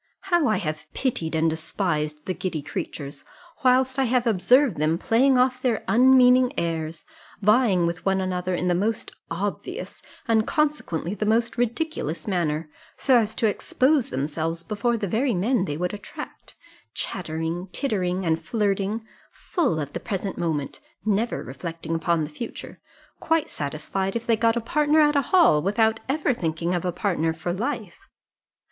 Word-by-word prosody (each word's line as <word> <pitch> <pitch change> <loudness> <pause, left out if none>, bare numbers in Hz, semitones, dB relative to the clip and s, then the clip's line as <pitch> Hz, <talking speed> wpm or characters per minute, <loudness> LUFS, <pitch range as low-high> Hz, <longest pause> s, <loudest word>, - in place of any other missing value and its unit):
How 340 -5 +4
I 215 - +2
have 155 -5 -4
pitied 165 -12 -1
and 160 +1 +2
despised 155 -2 -2
the 185 - -1
giddy 170 -5 -3
creatures, 140 0 -6 0.4
whilst 260 +1 +3
I 265 - +3
have 250 0 +1
observed 240 - +3
them 155 +2 +2
playing 255 +7 +3
off 255 0 +2
their 245 -4 0
unmeaning 255 +1 +6
airs, 165 -1 -3 0.3
vying 210 -4 +4
with 170 +1 -3
one 195 0 +2
another 185 -1 -1
in 180 - -1
the 180 - +3
most 210 +5 -1 0.2
obvious, 205 - -4 0.3
and 220 -1 +3
consequently 295 - 0
the 210 0 -2
most 230 +2 +2
ridiculous 235 - -2
manner, 165 -5 0 0.3
so 265 - +3
as 220 -1 -2
to - - 0
expose 260 +5 +2
themselves 155 +5 -2
before 225 +4 0
the 210 - -2
very 235 +5 +1
men 210 +3 +1
they 145 -4 -3
would 180 +3 -2
attract: 205 - -9 0.4
chattering, 165 +1 -3
tittering, 185 -8 -1
and 165 0 0
flirting; 205 +2 -1 0.3
full 280 - -1
of 145 -1 -5
the - - -3
present 195 -1 -3
moment, 155 -5 -2 0.3
never 220 +3 0
reflecting 165 +6 -6
upon 165 0 +1
the 150 - -4
future; 230 +10 -7 0.4
quite 325 -1 +1
satisfied 190 +7 -3
if 235 0 -2
they 230 - +3
got 230 +1 +2
a - - 0
partner 300 +6 +2
at 295 -1 +4
a 280 -3 +2
ball, 335 - +6
without 220 +4 +2
ever 285 -1 +1
thinking 170 -3 -2
of 175 - -1
a 180 - +1
partner 165 -4 0
for 165 +2 -3
life! 220 -2 -4
195 Hz, 160 wpm, -24 LUFS, 165-245 Hz, 0.4 s, unmeaning